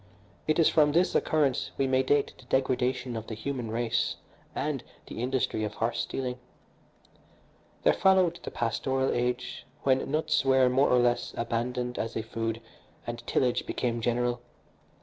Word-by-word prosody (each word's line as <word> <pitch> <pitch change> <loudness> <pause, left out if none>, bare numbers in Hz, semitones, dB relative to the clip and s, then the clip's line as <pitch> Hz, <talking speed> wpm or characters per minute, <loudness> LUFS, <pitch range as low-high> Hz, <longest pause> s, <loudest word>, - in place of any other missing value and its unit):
It 155 - +2
is 165 - +5
from 150 -2 +4
this 175 +3 +3
occurrence 145 -5 +1
we 135 - +2
may 130 0 +3
date 140 +2 +1
the 130 - -17
degradation 125 -1 0
of 110 0 -5
the 110 - -5
human 120 0 -4
race 115 +1 0 0.4
and - - -2 0.2
the - - -7
industry 125 -3 0
of 105 - -3
horse 115 +1 -1
stealing. 125 -1 -3 1.4
There - - +5
followed 185 -3 +3
the - - -5
pastoral 130 +3 0
age, 125 0 -2 0.2
when 130 0 +2
nuts 155 0 +1
were, 130 -1 +4
more 135 +3 +3
or 125 - +5
less, 120 0 +1
abandoned 125 +1 -2
as 115 - -3
a 110 - -1
food 115 0 -3 0.4
and - - -4
tillage 125 -2 +1
became 120 -1 -1
general. 120 +1 0
125 Hz, 155 wpm, -28 LUFS, 120-135 Hz, 1.4 s, is